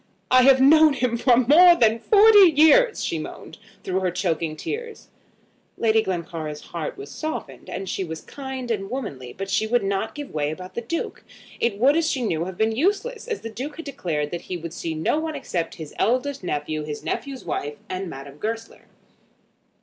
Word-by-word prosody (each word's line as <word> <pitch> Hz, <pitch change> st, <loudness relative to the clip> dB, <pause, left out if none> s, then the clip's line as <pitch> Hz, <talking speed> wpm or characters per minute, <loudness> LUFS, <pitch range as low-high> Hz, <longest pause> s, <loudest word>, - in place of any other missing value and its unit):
"I 255 Hz, 0 st, +7 dB
have 265 Hz, -1 st, +7 dB
known 310 Hz, +3 st, +6 dB
him 250 Hz, -3 st, 0 dB
for 240 Hz, 0 st, +4 dB
more 320 Hz, +8 st, +7 dB
than 230 Hz, -5 st, +3 dB
forty 410 Hz, -, +7 dB
years," 440 Hz, +11 st, +5 dB
she -, -, -2 dB
moaned, -, -, -9 dB, 0.2 s
through 185 Hz, 0 st, -1 dB
her 185 Hz, -1 st, 0 dB
choking 165 Hz, -3 st, -2 dB
tears. 455 Hz, -, -6 dB, 0.7 s
Lady 220 Hz, -1 st, +3 dB
Glencora's 165 Hz, -6 st, -4 dB
heart 170 Hz, -3 st, -6 dB
was 140 Hz, +1 st, -9 dB
softened, 315 Hz, 0 st, -6 dB
and 195 Hz, -, -5 dB
she 190 Hz, -, -2 dB
was 160 Hz, -2 st, -6 dB
kind 265 Hz, -3 st, -6 dB
and 195 Hz, -3 st, -2 dB
womanly; 145 Hz, -, -5 dB
but 195 Hz, +7 st, -6 dB
she 215 Hz, +2 st, 0 dB
would 240 Hz, -1 st, +1 dB
not 200 Hz, +3 st, -2 dB
give 290 Hz, -1 st, -7 dB
way 150 Hz, -1 st, -1 dB
about 185 Hz, +4 st, -8 dB
the 235 Hz, -, -3 dB
Duke. 330 Hz, +9 st, -4 dB, 0.4 s
It 235 Hz, -4 st, 0 dB
would, 270 Hz, +7 st, +4 dB
as 330 Hz, -1 st, +2 dB
she 260 Hz, -, -1 dB
knew, 170 Hz, -6 st, -1 dB
have 185 Hz, -1 st, -7 dB
been 220 Hz, +1 st, +2 dB
useless, 415 Hz, -, -1 dB
as 450 Hz, -3 st, -3 dB
the 225 Hz, -, -6 dB
Duke 270 Hz, +7 st, -6 dB
had 330 Hz, -, -8 dB
declared 165 Hz, -, -3 dB
that 170 Hz, -, -4 dB
he 180 Hz, -, -5 dB
would 170 Hz, -1 st, -7 dB
see 165 Hz, -1 st, -4 dB
no 160 Hz, -, 0 dB
one 315 Hz, 0 st, -4 dB
except 170 Hz, -2 st, -3 dB
his 155 Hz, -2 st, -9 dB
eldest 255 Hz, +1 st, 0 dB
nephew, 155 Hz, -2 st, -2 dB
his 150 Hz, -1 st, -6 dB
nephew's 275 Hz, -2 st, -4 dB
wife, 145 Hz, +1 st, -3 dB
and 185 Hz, 0 st, -4 dB
Madame 140 Hz, +1 st, -10 dB
Goesler. 225 Hz, +1 st, -5 dB
220 Hz, 195 wpm, -23 LUFS, 170-280 Hz, 0.7 s, I